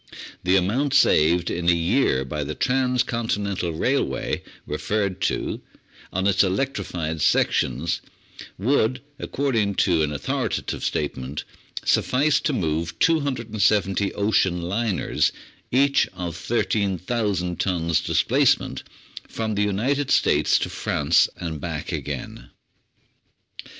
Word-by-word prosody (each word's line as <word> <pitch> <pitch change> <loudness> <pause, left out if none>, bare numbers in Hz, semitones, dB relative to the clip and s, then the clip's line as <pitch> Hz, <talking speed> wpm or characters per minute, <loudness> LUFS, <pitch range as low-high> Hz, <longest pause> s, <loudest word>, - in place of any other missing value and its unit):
The 90 +1 +2
amount 115 +10 +1
saved 85 +3 +4
in 85 0 0
a - - +6
year 85 - +1
by 75 +2 -3
the 75 +2 -5
Transcontinental 115 -8 0
railway 80 - -1 0.2
referred 100 -3 -2
to - - -3 0.5
on 95 +1 -1
its 100 0 +4
electrified 90 - -2
sections 70 +6 +1 0.6
would, 125 +3 +1 0.2
according 115 -8 0
to 85 -4 +2
an 75 -1 0
authoritative 70 - -2
statement, 70 -1 -3 0.4
suffice 145 +3 +2
to - - -1
move 85 - -2
270 110 - +1
ocean 95 -4 +1
liners, 100 +3 0 0.4
each 140 +2 +3
of 90 -3 -4
13,000 100 -2 -1
tons 85 -4 +1
displacement, - - +2 0.5
from 110 -1 -3
the 105 - 0
United 120 +8 0
States - - +3
to - - -2
France 75 +3 +2
and 80 -4 -5
back - - -4
again. - - -5
95 Hz, 105 wpm, -23 LUFS, 85-115 Hz, 0.6 s, a